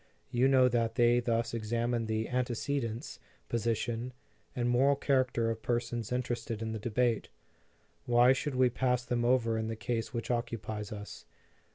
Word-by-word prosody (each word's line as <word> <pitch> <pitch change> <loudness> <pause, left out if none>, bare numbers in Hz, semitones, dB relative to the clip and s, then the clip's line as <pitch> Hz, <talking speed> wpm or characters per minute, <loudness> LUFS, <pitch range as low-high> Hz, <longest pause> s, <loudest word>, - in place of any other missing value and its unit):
You 125 +2 +3
know 130 -1 +5
that 115 -2 0
they 120 0 +4
thus 115 -1 0
examine 115 +1 -1
the 110 0 -1
antecedents, 125 0 -2 0.3
position, 115 +1 -1 0.4
and 120 -1 0
moral 130 +4 +4
character 130 -5 +1
of 110 0 -5
persons 120 -1 -2
interested 120 -3 -2
in 110 - -3
the 110 - -4
debate. 120 +1 0 0.8
Why 120 +1 +6
should 135 +1 -3
we 125 -1 +4
pass 125 0 0
them 120 -1 0
over 115 -2 +2
in 110 - -2
the 115 - -3
case 115 0 -3
which 120 0 -3
occupies 110 -3 -3
us? 105 - -8
120 Hz, 155 wpm, -31 LUFS, 115-125 Hz, 0.8 s, Why